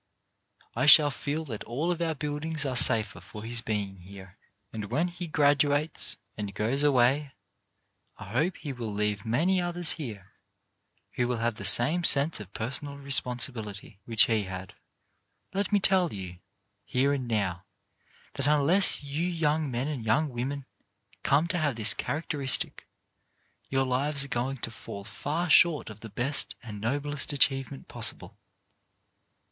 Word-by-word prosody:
I 130 Hz, +4 st, 0 dB
shall 150 Hz, -1 st, +8 dB
feel 150 Hz, +3 st, -4 dB
that 115 Hz, -7 st, -6 dB
all 150 Hz, +9 st, -2 dB
of 170 Hz, -1 st, -3 dB
our 165 Hz, -2 st, -1 dB
buildings 150 Hz, +1 st, -3 dB
are 130 Hz, -2 st, -2 dB
safer 110 Hz, -2 st, +4 dB
for 105 Hz, -1 st, -10 dB
his 115 Hz, +1 st, -1 dB
being 100 Hz, -4 st, -3 dB
here, 95 Hz, +1 st, -13 dB, 0.4 s
and 110 Hz, -2 st, -5 dB
when 150 Hz, -, -1 dB
he 175 Hz, 0 st, -6 dB
graduates 145 Hz, 0 st, +1 dB, 0.2 s
and 100 Hz, -2 st, -6 dB
goes 115 Hz, +6 st, +1 dB
away 135 Hz, +1 st, +2 dB, 0.8 s
I 105 Hz, -1 st, -11 dB
hope 155 Hz, -, 0 dB
he 145 Hz, -4 st, -6 dB
will 115 Hz, -4 st, -6 dB
leave 105 Hz, 0 st, -2 dB
many 175 Hz, +11 st, +1 dB
others 175 Hz, -1 st, +3 dB
here 105 Hz, -10 st, -7 dB, 0.8 s
who 125 Hz, -, -1 dB
will 125 Hz, -1 st, -2 dB
have 115 Hz, +1 st, -1 dB
the 105 Hz, -2 st, -8 dB
same 135 Hz, -, +6 dB
sense 150 Hz, -2 st, +5 dB
of 100 Hz, -2 st, -10 dB
personal 140 Hz, +6 st, -3 dB
responsibility 125 Hz, -7 st, -2 dB
which 115 Hz, -2 st, +5 dB
he 110 Hz, -3 st, 0 dB
had. 95 Hz, 0 st, -8 dB, 0.8 s
Let 200 Hz, +2 st, -2 dB
me 205 Hz, -, +3 dB
tell 190 Hz, -3 st, +3 dB
you, 90 Hz, -3 st, -7 dB, 0.4 s
here 135 Hz, +3 st, 0 dB
and 130 Hz, -3 st, -3 dB
now, 95 Hz, -5 st, -2 dB, 0.7 s
that 140 Hz, -, -2 dB
unless 150 Hz, +5 st, +3 dB
you 145 Hz, +5 st, -2 dB
young 160 Hz, -3 st, -1 dB
men 125 Hz, +2 st, -3 dB
and 145 Hz, -6 st, -5 dB
young 145 Hz, +8 st, +1 dB
women 135 Hz, +3 st, -5 dB, 0.6 s
come 145 Hz, +4 st, +2 dB
to 180 Hz, -2 st, 0 dB
have 145 Hz, -5 st, -1 dB
this 110 Hz, -1 st, +5 dB
charac 155 Hz, +3 st, -4 dB
teristic, 140 Hz, -5 st, +1 dB, 0.8 s
your 135 Hz, 0 st, 0 dB
lives 140 Hz, +3 st, 0 dB
are -, -, -7 dB
going 130 Hz, +3 st, -2 dB
to 115 Hz, -, -4 dB
fall 100 Hz, -3 st, -9 dB
far 150 Hz, -, -4 dB
short 160 Hz, -6 st, +4 dB
of 110 Hz, -, -13 dB
the 115 Hz, -, -10 dB
best 120 Hz, -2 st, 0 dB
and 105 Hz, -3 st, -9 dB
noblest 145 Hz, +6 st, -3 dB
achievement 135 Hz, -, +1 dB
possible. -, -, -5 dB
135 Hz, 155 wpm, -27 LUFS, 110-150 Hz, 0.8 s, shall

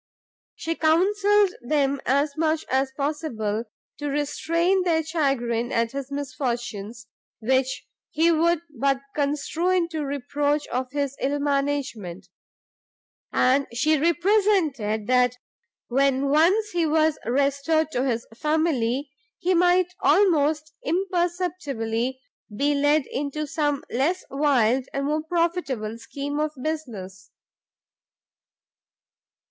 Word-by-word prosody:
She 330 Hz, -, -3 dB
counselled 395 Hz, +5 st, +3 dB
them 275 Hz, +1 st, 0 dB
as 280 Hz, +2 st, +2 dB
much 315 Hz, 0 st, 0 dB
as 265 Hz, +1 st, +1 dB
possible 240 Hz, -7 st, -2 dB, 0.3 s
to 290 Hz, -, -3 dB
restrain 335 Hz, +6 st, +1 dB
their 330 Hz, -3 st, +1 dB
chagrin 270 Hz, -7 st, 0 dB
at 230 Hz, 0 st, +1 dB
his 275 Hz, 0 st, -6 dB
misfortunes, 240 Hz, -6 st, -4 dB, 0.3 s
which 260 Hz, +3 st, 0 dB, 0.2 s
he 330 Hz, +2 st, +3 dB
would 335 Hz, 0 st, +2 dB
but 275 Hz, +2 st, +1 dB
construe 300 Hz, +4 st, -1 dB
into 335 Hz, -4 st, 0 dB
reproach 285 Hz, +2 st, -1 dB
of 255 Hz, +1 st, -2 dB
his 280 Hz, 0 st, -2 dB
ill 280 Hz, +2 st, 0 dB
management; 275 Hz, -11 st, -2 dB, 1.0 s
and 270 Hz, +2 st, +3 dB
she 310 Hz, +5 st, +2 dB
represented 335 Hz, -, +2 dB
that 250 Hz, 0 st, +3 dB, 0.5 s
when 275 Hz, +1 st, +2 dB
once 370 Hz, +9 st, +3 dB
he 340 Hz, -2 st, +1 dB
was 310 Hz, 0 st, +2 dB
restored 280 Hz, +5 st, +1 dB
to 250 Hz, -3 st, 0 dB
his 240 Hz, -3 st, -1 dB
family, 280 Hz, -2 st, 0 dB, 0.3 s
he 370 Hz, 0 st, +1 dB
might 360 Hz, +1 st, +3 dB
almost 310 Hz, -5 st, +3 dB
imperceptibly 335 Hz, -, -1 dB, 0.4 s
be 290 Hz, +3 st, +2 dB
led 290 Hz, 0 st, +2 dB
into 290 Hz, +2 st, -3 dB
some 290 Hz, -1 st, -1 dB
less 320 Hz, +9 st, 0 dB
wild 265 Hz, -3 st, +2 dB
and 275 Hz, 0 st, -1 dB
more 305 Hz, +2 st, 0 dB
profitable 320 Hz, -10 st, -1 dB
scheme 285 Hz, +4 st, -4 dB
of 305 Hz, 0 st, -1 dB
business. 220 Hz, -11 st, -5 dB
285 Hz, 110 wpm, -24 LUFS, 260-320 Hz, 1.0 s, counselled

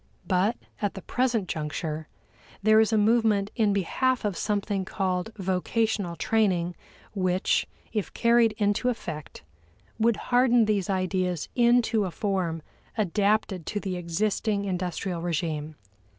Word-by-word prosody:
But, 195 Hz, +5 st, +1 dB, 0.2 s
at 205 Hz, -1 st, -1 dB
the 195 Hz, -, -8 dB
present 245 Hz, -6 st, 0 dB
juncture, 155 Hz, 0 st, -3 dB, 0.6 s
there 215 Hz, +1 st, +6 dB
is 220 Hz, +1 st, +3 dB
a 220 Hz, -, +3 dB
movement 210 Hz, -2 st, +3 dB
in 215 Hz, -3 st, +3 dB
behalf 235 Hz, +6 st, 0 dB
of 205 Hz, -3 st, 0 dB
something 205 Hz, -1 st, -1 dB
called 185 Hz, +1 st, -2 dB
vocational 190 Hz, 0 st, 0 dB
training 180 Hz, -5 st, +1 dB, 0.4 s
which, 185 Hz, -2 st, +1 dB, 0.3 s
if 210 Hz, -3 st, -2 dB
carried 235 Hz, -2 st, +3 dB
into 210 Hz, +3 st, +1 dB
effect, 155 Hz, -, -6 dB, 0.6 s
would 230 Hz, 0 st, +3 dB
harden 245 Hz, -1 st, +3 dB
these 205 Hz, -2 st, 0 dB
ideas 185 Hz, -3 st, -1 dB
into 235 Hz, -3 st, +3 dB
a -, -, -2 dB
form 180 Hz, -4 st, -2 dB, 0.3 s
adapted 205 Hz, -2 st, +1 dB
to 210 Hz, -, -2 dB
the 190 Hz, -2 st, -3 dB
existing 200 Hz, +4 st, -1 dB
industrial 180 Hz, -1 st, -2 dB
regime. 160 Hz, -3 st, -2 dB
200 Hz, 125 wpm, -27 LUFS, 180-220 Hz, 0.6 s, there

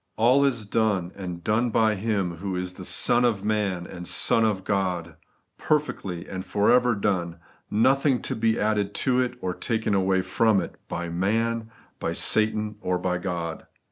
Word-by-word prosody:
All 125 Hz, +5 st, +4 dB
is 125 Hz, -6 st, 0 dB
done, 100 Hz, -5 st, 0 dB
and 90 Hz, -3 st, -6 dB
done 110 Hz, +5 st, +1 dB
by 110 Hz, -1 st, +3 dB
Him 100 Hz, -4 st, -2 dB
who 95 Hz, +1 st, -4 dB
is 90 Hz, 0 st, -3 dB, 0.2 s
Son 120 Hz, -, +3 dB
of 110 Hz, -5 st, +1 dB
man 100 Hz, -5 st, -1 dB
and 90 Hz, -1 st, -9 dB
Son 115 Hz, -, +3 dB
of 105 Hz, -4 st, 0 dB
God; 90 Hz, -5 st, -2 dB, 0.4 s
perfectly 100 Hz, -, -1 dB
and 95 Hz, 0 st, -5 dB
for 100 Hz, +1 st, +2 dB
ever 125 Hz, -1 st, +4 dB
done; 90 Hz, -5 st, -1 dB, 0.3 s
nothing 135 Hz, +4 st, +3 dB
to -, -, -3 dB
be 115 Hz, 0 st, +1 dB
added 105 Hz, -1 st, 0 dB
to 130 Hz, -2 st, +1 dB
it 125 Hz, -, -2 dB
or 90 Hz, -1 st, -2 dB
taken 95 Hz, -4 st, 0 dB
from 110 Hz, -1 st, +2 dB
it, -, -, -5 dB
by 85 Hz, 0 st, -4 dB
man, 110 Hz, +6 st, -1 dB, 0.3 s
by -, -, -2 dB
Satan, 110 Hz, -1 st, +1 dB
or 90 Hz, -3 st, 0 dB
by 90 Hz, 0 st, -1 dB
God. 85 Hz, -3 st, -4 dB
105 Hz, 165 wpm, -25 LUFS, 90-115 Hz, 0.4 s, All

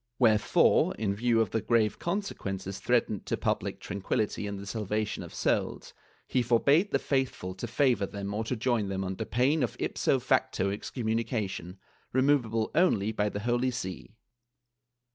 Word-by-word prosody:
Wherefore, 110 Hz, -4 st, +4 dB
in 100 Hz, -2 st, -1 dB
view 115 Hz, +2 st, +2 dB
of 110 Hz, -, 0 dB
the 115 Hz, -, 0 dB
grave 110 Hz, -3 st, +2 dB
consequences 100 Hz, -, -3 dB
threatened -, -, 0 dB
to -, -, 0 dB
public -, -, -1 dB
tranquility 100 Hz, +2 st, -2 dB
and 100 Hz, 0 st, -4 dB
the 100 Hz, -, -8 dB
salvation 105 Hz, 0 st, -2 dB
of -, -, -8 dB
souls, -, -, -1 dB, 0.3 s
he 130 Hz, -, +1 dB
forbade 140 Hz, -, +3 dB
the -, -, +2 dB
faithful 130 Hz, -9 st, -1 dB
to 95 Hz, +6 st, -5 dB
favor 120 Hz, -5 st, +2 dB
them 100 Hz, 0 st, -5 dB
or 110 Hz, +2 st, -1 dB
to 125 Hz, -, -1 dB
join 120 Hz, -3 st, 0 dB
them 95 Hz, 0 st, -2 dB
under 95 Hz, +3 st, -3 dB
pain 130 Hz, +8 st, +2 dB
of 125 Hz, -, -1 dB
ij)SO -, -, +1 dB
facto 100 Hz, +1 st, +1 dB
excommunication, 110 Hz, -4 st, -3 dB, 0.4 s
removable 130 Hz, -5 st, +2 dB
only 110 Hz, -, +3 dB
by 105 Hz, -1 st, 0 dB
the 100 Hz, -, -5 dB
Holy 120 Hz, +3 st, +1 dB
See. 95 Hz, -3 st, -6 dB
110 Hz, 155 wpm, -29 LUFS, 100-125 Hz, 0.4 s, Wherefore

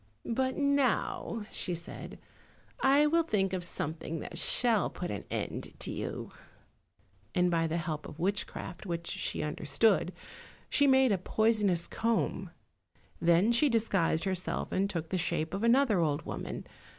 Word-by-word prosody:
"But 260 Hz, +2 st, 0 dB
now," 280 Hz, -5 st, +1 dB
she 180 Hz, -, 0 dB
said, 170 Hz, 0 st, -8 dB, 0.6 s
"I 280 Hz, +2 st, +5 dB
will 330 Hz, +3 st, +4 dB
think 195 Hz, -, 0 dB
of 185 Hz, -1 st, -1 dB
something 160 Hz, -1 st, -3 dB
that -, -, -7 dB
shall 225 Hz, +4 st, +2 dB
put 180 Hz, -, -5 dB
an 100 Hz, -, -5 dB
end -, -, -4 dB
to -, -, -3 dB
you," -, -, -5 dB, 1.0 s
and 180 Hz, 0 st, +3 dB
by 165 Hz, -1 st, +2 dB
the 160 Hz, +1 st, -1 dB
help 155 Hz, -2 st, -3 dB
of 150 Hz, -, -10 dB
witchcraft, 195 Hz, +1 st, -2 dB
which 170 Hz, -1 st, -3 dB
she -, -, -2 dB
understood, 155 Hz, +6 st, +2 dB, 0.6 s
she 285 Hz, -, +4 dB
made 265 Hz, -2 st, +5 dB
a 195 Hz, -, +2 dB
poisonous 205 Hz, -3 st, +2 dB
comb. 230 Hz, 0 st, -1 dB, 0.7 s
Then 170 Hz, +6 st, +4 dB
she 260 Hz, +5 st, +4 dB
disguised 195 Hz, -8 st, +1 dB
herself 185 Hz, -2 st, -1 dB
and 195 Hz, +1 st, +1 dB
took 165 Hz, -4 st, -4 dB
the 185 Hz, -, -1 dB
shape 160 Hz, 0 st, 0 dB
of 195 Hz, +3 st, -2 dB
another 235 Hz, -4 st, +4 dB
old 150 Hz, -3 st, +1 dB
woman. -, -, -5 dB
190 Hz, 150 wpm, -31 LUFS, 170-230 Hz, 1.0 s, I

